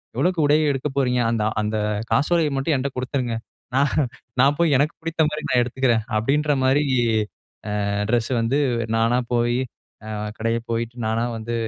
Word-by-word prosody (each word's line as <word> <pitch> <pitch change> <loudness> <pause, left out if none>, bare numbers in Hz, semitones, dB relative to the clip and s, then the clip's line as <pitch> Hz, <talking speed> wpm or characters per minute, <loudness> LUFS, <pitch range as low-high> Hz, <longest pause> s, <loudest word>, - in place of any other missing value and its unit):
எவ்வளோக்கு 180 -2 +1
உடையை 155 +1 +4
எடுக்கப் 135 +1 -4
போறீங்க? 125 -2 +2
அந்த 115 -2 0 0.2
அந்த 105 +1 -1 0.3
காசோலையை 155 +1 +2
மட்டும் 135 +4 0
என்கிட்ட 135 0 -2
கொடுத்துருங்க. 130 -1 -2 0.4
நான் 140 +1 +3 0.5
நான் 140 +2 +4
போய் 165 -4 +4
எனக்கு 150 +3 +1
பிடிச்ச 165 0 -6
மாதிரி 155 0 -5
நான் 125 -1 +4
எடுத்துக்கிறேன்." 120 -2 +1
அப்படின்ற 145 +7 +1
மாதிரி 135 +3 +3 1.3
ட்ரெஸ் 120 +1 +1
வந்து 120 +5 +1 0.4
நானா 115 +2 +2
போய், 120 0 +2 0.8
கடையில 115 +1 0
போயிட்டு 115 +1 -2
நானா 110 +1 0
வந்து 115 +1 -5
130 Hz, 145 wpm, -22 LUFS, 115-145 Hz, 1.3 s, உடையை